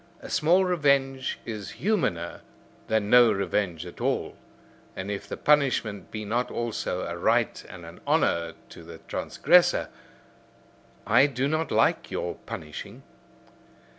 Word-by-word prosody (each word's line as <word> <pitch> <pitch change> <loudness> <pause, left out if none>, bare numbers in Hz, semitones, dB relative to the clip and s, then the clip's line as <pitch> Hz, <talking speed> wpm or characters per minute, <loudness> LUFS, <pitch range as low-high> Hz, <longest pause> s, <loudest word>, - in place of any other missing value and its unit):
A - - -10
small 180 +2 +3
revenge 140 -6 +1
is 105 -3 -6
humaner 150 - -1 0.5
than 110 -2 0
no 120 -2 +7
revenge 95 -4 -1
at 90 - -10
all. - - -1 0.6
And 95 +2 -4
if 100 0 -5
the - - -5
punishment 125 -9 +1
be 110 -1 -6
not 120 +4 -1
also 115 -5 -3
a 85 -1 -4
right 85 - +1
and 85 -2 -10
an 85 +1 -12
honour 85 -1 +1 0.2
to - - -12
the 85 0 -11
transgressor, - - +3 1.2
I 140 - +5
do 135 -1 -1
not 155 +2 -1
like - - +2
your - - -3
punishing. 75 -1 -8
110 Hz, 135 wpm, -26 LUFS, 90-140 Hz, 1.2 s, no